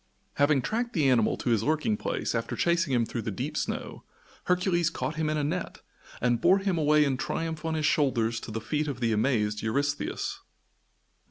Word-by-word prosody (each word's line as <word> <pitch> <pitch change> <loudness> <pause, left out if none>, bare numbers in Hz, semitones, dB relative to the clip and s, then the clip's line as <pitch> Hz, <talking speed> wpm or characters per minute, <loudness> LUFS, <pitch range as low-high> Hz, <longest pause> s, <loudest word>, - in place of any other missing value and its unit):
Having 145 -2 +3
tracked 235 - -2
the 150 -5 +2
animal 120 -4 +3
to 120 - -1
his 110 -3 +3
lurking 155 - +1
place 215 - -2
after 115 0 -2
chasing 170 -3 +1
him 120 -3 +2
through 115 - -4
the 110 - -4
deep 95 - -4
snow, - - -4 0.4
Hercules 180 -2 +2
caught 160 -1 -4
him 155 -1 -1
in 155 - 0
a 150 - 0
net 170 +5 -3 0.4
and 120 -1 +1
bore 185 +3 +5
him 195 -3 0
away 150 0 +4
in 135 -2 0
triumph 160 +4 -3
on 160 -1 -1
his 155 -1 0
shoulders 115 -7 +1
to - - -9
the 110 +1 -3
feet 150 +5 -1
of 135 -4 -4
the 115 -2 +1
amazed 105 -2 +1
Eurystheus. 145 +6 -2
145 Hz, 195 wpm, -28 LUFS, 120-165 Hz, 0.4 s, bore